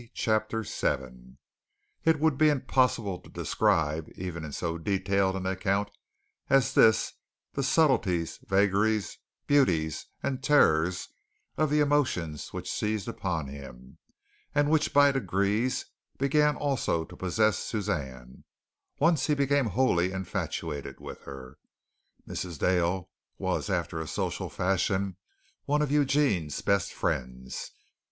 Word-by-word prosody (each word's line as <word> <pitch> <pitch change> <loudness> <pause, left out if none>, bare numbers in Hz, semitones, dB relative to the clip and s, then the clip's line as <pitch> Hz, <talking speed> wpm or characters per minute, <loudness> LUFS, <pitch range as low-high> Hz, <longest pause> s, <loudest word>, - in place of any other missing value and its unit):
CHAPTER 110 0 0
VII 65 - -3 0.7
It 160 -2 +4
would 160 -1 +3
be 155 +3 +5
impossible 125 -8 +1
to - - -17
describe 80 0 0
even 90 -3 -5
in 75 - -6
so 85 +3 -3
detailed 95 +1 +1
an 95 -1 -4
account 100 +2 0 0.6
as 135 -2 +3
this 110 -1 +4 0.4
the 140 - -1
subtleties, 130 - +2
vagaries, 100 +2 +2 0.3
beauties 85 - +2 0.2
and 130 -1 -2
terrors 90 - +3 0.5
of 155 0 +1
the 150 +1 +3
emotions 125 - 0
which - - -5
seized 105 -2 -2
upon 85 -6 -2
him, 65 -2 -11 0.6
and 145 0 +3
which 160 -1 +2
by 145 0 +6
degrees 105 0 0 0.3
began 150 +2 +3
also 135 - 0
to - - -13
possess 110 +3 +1
Suzanne, 65 - -4 0.5
once 155 -2 +3
he 150 - +3
became 140 -2 +2
wholly 95 -7 +2
infatuated 90 -6 -4
with - - -9
her. 65 0 -10 0.7
Mrs. 85 -4 -5
Dale, 90 +2 +1 0.3
was, - - -2
after 80 - -1
a 80 - -5
social - - -3
fashion, 95 +1 0 0.5
one 150 +1 +2
of 145 - -2
Eugene's 140 - +2
best 100 0 +1
friends. 65 0 -3
100 Hz, 120 wpm, -28 LUFS, 85-135 Hz, 0.7 s, by